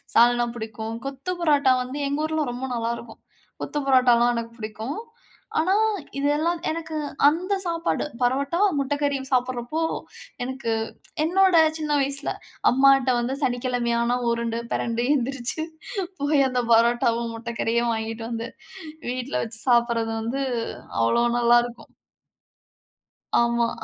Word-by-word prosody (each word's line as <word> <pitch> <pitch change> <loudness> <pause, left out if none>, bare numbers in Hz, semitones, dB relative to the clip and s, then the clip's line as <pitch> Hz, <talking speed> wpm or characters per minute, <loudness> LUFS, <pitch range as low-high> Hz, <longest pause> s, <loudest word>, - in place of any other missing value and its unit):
சால்னா 240 +1 +5
புடிக்கும், 220 0 -5
கொத்து 275 +7 -4
பரோட்டா 290 -5 +4
வந்து 260 +4 -6
எங்க 285 +2 -1
ஊர்ல 315 -4 -1
ரொம்ப 255 +2 -4
நல்லாருக்கும். 235 0 -4 0.4
கொத்து 295 - -2
பரோட்டாலாம் 245 -2 +5
எனக்கு 230 0 -4
புடிக்கும். 220 - -5 0.6
ஆனா, 360 +4 +2 0.4
இதெல்லாம் 300 +5 +1
எனக்கு 320 0 -4 0.3
அந்த 350 +7 +1
சாப்பாடு 335 -1 -1 0.2
பரோட்டா, 275 +7 +1 0.2
முட்டக்கறியும் 280 -1 -1
சாப்பட்றப்போ 255 +4 0 0.6
எனக்கு 260 -2 -3 0.5
என்னோட 370 +2 +4 0.2
சின்ன 305 -1 -3
வயசுல, 275 +1 -2 0.4
அம்மாட்ட 270 0 +5
வந்து 245 +3 -1
சனிக்கிழமையான 245 -1 0
உருண்டு 235 0 -1
பிரண்டு 235 +1 -1
எந்திரிச்சு. 270 +3 -2 0.6
போய் 285 -1 +3
அந்த 250 -1 0
பரோட்டாவும், 235 0 +2
முட்டக்கறியும் 235 0 -1
வாங்கிட்டு 225 +1 -4
வந்து 230 +1 -3 0.6
வீட்ல 255 +2 -2
வச்சு 225 0 -8
சாப்பட்றது 235 -2 +3
வந்து 260 +5 -2 0.6
அவ்ளோ 115 - +3 0.2
நல்லாருக்கும். 240 0 +2 1.5
ஆமா. 235 0 +2
245 Hz, 110 wpm, -24 LUFS, 235-280 Hz, 1.5 s, சால்னா